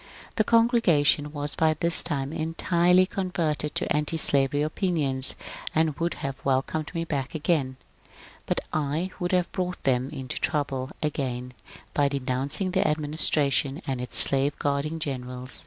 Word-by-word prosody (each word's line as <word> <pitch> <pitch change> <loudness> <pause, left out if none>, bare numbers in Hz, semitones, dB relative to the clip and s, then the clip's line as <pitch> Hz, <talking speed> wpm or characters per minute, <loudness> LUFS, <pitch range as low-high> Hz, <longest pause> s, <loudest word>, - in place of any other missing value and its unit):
The 215 - +4
congregation 205 - +3
was 145 -1 -1
by 160 -1 +2
this 170 +2 +2
time 140 -3 -2
entirely 170 +3 +2
converted 170 -6 -2
to - - -1
^tislavery 145 -2 +3
opinions, 150 -7 +3 0.4
and 160 -2 +2
would 170 +1 -1
have 135 -1 -5
welcomed 135 +3 -1
me 165 - -1
back 140 -2 -3
again. 145 -5 0 0.7
But - - 0
I 155 +5 -1
would 175 -1 -2
have 180 -2 +1
brought 180 -1 -4
them 130 0 +1
into 135 -4 -5
trouble 135 -4 -1
again 125 -4 -3 0.4
by 145 -1 +2
denouncing 140 +6 -1
the 190 +1 +1
administration 150 -2 +1
and 130 -2 -3
its 125 - -3
slave 140 +1 +2
guarding 145 +3 -1
generals. 125 -3 -5
150 Hz, 140 wpm, -26 LUFS, 135-165 Hz, 0.7 s, The